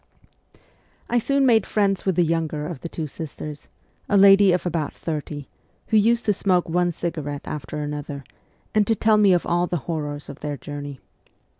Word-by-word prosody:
I 240 - +4
soon 275 +3 +2
made 225 -5 +5
friends 200 -2 +1
with 190 - +2
the 175 - +4
younger 160 -2 -1
of 155 -4 -6
the 170 - -5
two 160 - -4
sisters, 150 0 -8 0.4
a 205 - +4
lady 195 0 +7
of 180 +1 0
about 165 -4 -2
thirty, 150 -3 -5 0.4
who 220 - +1
used 235 +3 +3
to 210 - +3
smoke 185 -2 +1
one 175 +1 +1
cigarette 155 -4 -4
after 150 0 -5
another, 145 -1 -5 0.5
and 210 -2 +3
to 225 - +3
tell 215 +1 +3
me 205 -2 +5
of 175 -1 +2
all 175 +1 +1
the 175 - -1
horrors 145 -3 -4
of 140 - -9
their 145 -1 -4
journey. 145 -1 -7
170 Hz, 180 wpm, -23 LUFS, 150-200 Hz, 0.5 s, lady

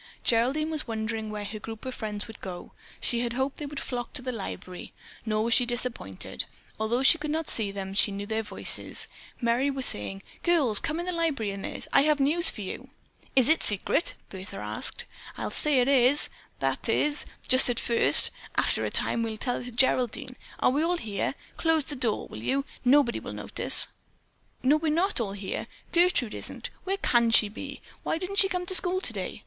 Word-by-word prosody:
Geraldine 265 +7 +2
was 310 -3 -1
wondering 220 -1 -3
where 210 -1 -5
her 215 +1 -6
group 225 +3 -8
of 260 - -4
friends 210 -3 -4
would 225 - -12
go. 180 -2 -7 0.3
She 235 - 0
had 235 -1 -1
hoped 265 +2 -1
they 295 - -5
would 285 0 -5
flock 245 -2 -5
to 255 - -5
the 255 - -2
library, 190 -5 -7 0.3
nor 215 0 +1
was 230 +1 +1
she 250 - +6
disappointed. 240 - -4 0.3
Although 235 +4 0
she 330 +5 +6
could 300 0 -4
not 315 +1 -1
see 215 -3 +1
them, 195 -1 -5
she 200 +1 +3
knew 200 +1 -5
their 220 +1 -1
voices. 210 -3 +3 0.3
Merry 240 +4 +2
was 270 -2 +2
saying, 100 -1 +2 0.2
"Girls, 290 -11 +4
come 325 0 -2
in 345 - -3
the 365 - -1
library 315 - -1
a 195 - -6
minute. - - -6
I - - +7
have 300 +1 +3
some 275 - +1
news 340 +5 +3
for 210 - -6
you." 190 - -6 0.5
"Is 260 -2 +5
it 320 +1 +4
secret?" 210 - +1
Bertha 190 - -8
asked. 105 +1 -3 0.3
"I'll - - -3
say 295 -4 +1
it 245 - +3
is—that 275 +1 +1
is, 295 0 +1 0.2
just 255 0 +6
at 240 - 0
first; 235 - +5 0.2
after - - +1
a - - -1
time 230 - +1
we'll 225 -1 -3
tell 245 +3 -1
it - - -9
to 245 - -7
Geraldine. 250 0 +1 0.2
Are - - +4
we 285 +3 +1
all 345 +2 +1
here? 215 - -3 0.2
Close 325 -3 +2
the 295 - -5
door, 240 -5 0
will 110 - -9
you; 275 - 0 0.2
nobody 255 -1 +4
will - - -7
notice." - - +2 0.8
"No, 280 +4 +5
we're 310 0 0
not 355 +3 +2
all 200 -3 -3
here. 200 -1 -5 0.2
Gertrude 340 -10 +3
isn't. - - -7
Where 390 +1 0
can 235 -9 +3
she 220 -2 +5
be? 275 +6 -8 0.2
Why - - -1
didn't 370 +3 -4
she 385 - +5
come 360 -2 -2
to 375 - -1
school 370 0 +3
today?" - - -4
245 Hz, 205 wpm, -27 LUFS, 220-300 Hz, 0.8 s, I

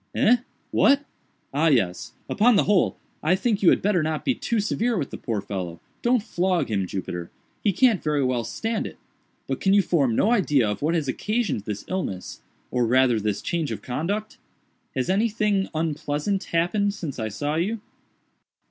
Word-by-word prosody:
"Eh?—what?—ah 245 - +1
yes!—upon 145 - +2
the - - +4
whole 200 -3 +2 0.2
I 165 +4 +3
think 210 +1 0
you 180 - +6
had - - +3
better 200 -4 +3
not 155 0 -2
be 265 - +3
too 235 -2 -1
severe 225 +3 0
with 145 -6 -3
the - - -5
poor 110 -4 -2
fellow—don't 95 - -2
flog 180 - 0
him, 95 -3 0
Jupiter—he 90 - -4
can't 235 -2 +4
very 150 -2 +1
well 125 -2 0
stand 220 - -2
it—but - - -10
can 195 - +3
you 200 - +5
form 140 -10 +2
no 215 - +3
idea 150 - +3
of 105 - -3
what 160 +4 +1
has 155 -4 0
occasioned 205 - -1
this 105 -2 -5
illness, 170 - -4 0.3
or 125 -2 +1
rather 125 -1 +4
this 105 -1 -2
change 165 -5 -1
of - - -5
conduct? 200 +12 -3 0.6
Has 130 -1 0
anything 210 -1 +1
unpleasant 155 +4 -1
happened 200 +5 +1
since 145 -10 -5
I 110 - -1
saw 145 +8 -3
you?" 195 +8 -1
165 Hz, 160 wpm, -24 LUFS, 125-210 Hz, 0.6 s, you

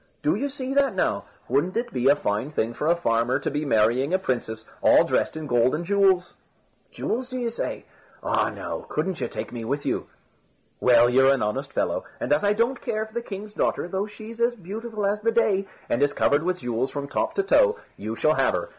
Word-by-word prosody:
"Do 300 - +3
you 285 -3 -1
see 265 -1 -4
that 275 -6 +2
now! 100 - 0 0.2
Wouldn't 145 - +1
it 240 +1 -2
be 125 0 +1
a 140 - +7
fine 105 -1 -2
thing 120 -6 -1
for 150 - -3
a 170 - +4
farmer 120 -5 +1
to 145 - -3
be 150 +2 -2
marrying 125 +6 +2
a - - +4
princess, 115 -9 -3 0.2
all - - +6
dressed - - 0
in 155 - -5
gold 120 0 +2
and 170 +3 -4
jewels?" 190 -2 +3 0.6
"Jewels, 250 +2 -3
do 255 - -4
you 240 -2 -1
say? - - -4 0.4
Ah, - - +1
now, - - -6
couldn't 190 -3 -2
you - - 0
take - - -6
me 120 -2 -6
with 140 +5 -2
you?" - - -1 0.7
"Well, 120 -1 +6
you're 130 +2 +5
an 135 - +1
honest 105 0 -2
fellow, - - -1 0.2
and 140 - +1
as 150 - +1
I 205 0 +3
don't 235 +4 0
care 215 0 -2
for 220 - -17
the 235 - -2
king's 210 -1 -8
daughter, 175 - 0
though 190 +3 -2
she's 220 +2 -10
as 240 +1 +2
beautiful 215 +2 -5
as 205 +1 0
the 230 +1 +2
day, 200 -4 +2 0.2
and 120 - 0
is 145 0 +3
covered 145 +1 +2
with 180 +2 -2
jewels 125 +2 -1
from 140 0 -5
top 325 - -1
to 395 - +1
toe, 460 +4 +4 0.2
you - - -5
shall - - +3
have - - +2
her. - - -3
180 Hz, 225 wpm, -25 LUFS, -, 0.7 s, a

